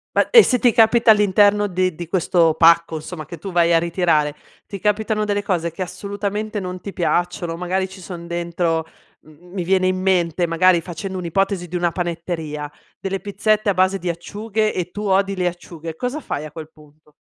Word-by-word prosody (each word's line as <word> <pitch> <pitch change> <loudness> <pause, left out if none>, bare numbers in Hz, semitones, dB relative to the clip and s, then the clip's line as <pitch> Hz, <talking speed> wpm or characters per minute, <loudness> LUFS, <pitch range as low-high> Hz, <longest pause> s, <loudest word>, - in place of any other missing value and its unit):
Ma - - +3
e 475 - +10
se 250 - +2
ti 245 - +4
capita 225 +1 +5
all'interno 205 0 +4
di 185 -1 0
di 170 +2 -7
questo 170 -2 +2
pacco, 165 0 +5
insomma, 155 0 -7
che 170 - -9
tu 195 +5 -7
vai 170 -1 +3
a - - +6
ritirare, 165 -4 +1 0.3
ti 200 - -8
capitano 215 +1 0
delle 205 -1 -1
cose 170 -5 -1
che 165 - -9
assolutamente 205 +3 -4
non 185 -1 -5
ti 200 - -6
piacciono 175 -1 -1
o - - -7
magari 185 +2 -1
ci 190 0 -13
son 175 -2 -8
dentro, 170 -1 -1 0.4
mhmm, 165 +4 -18
mi 185 - -2
viene 185 +1 +2
in 185 0 0
mente, 175 -2 +1
magari 170 +1 +3
facendo 185 +3 -6
un'ipotesi 180 +1 -1
di 180 - -7
una 175 -1 +1
panetteria, 165 -4 -4 0.3
delle 195 0 -3
pizzette 210 +2 0
a 200 - +3
base 185 +1 +2
di 180 - -3
acciughe 215 +5 -2
e 180 -1 -3
tu 210 - -6
odi 195 0 +2
le 180 -1 0
acciughe. 170 -2 -7
Cosa 250 - -3
fai 150 - -5
a 155 - -9
quel 155 0 -9
punto? 150 0 -22
180 Hz, 200 wpm, -20 LUFS, 170-200 Hz, 0.4 s, e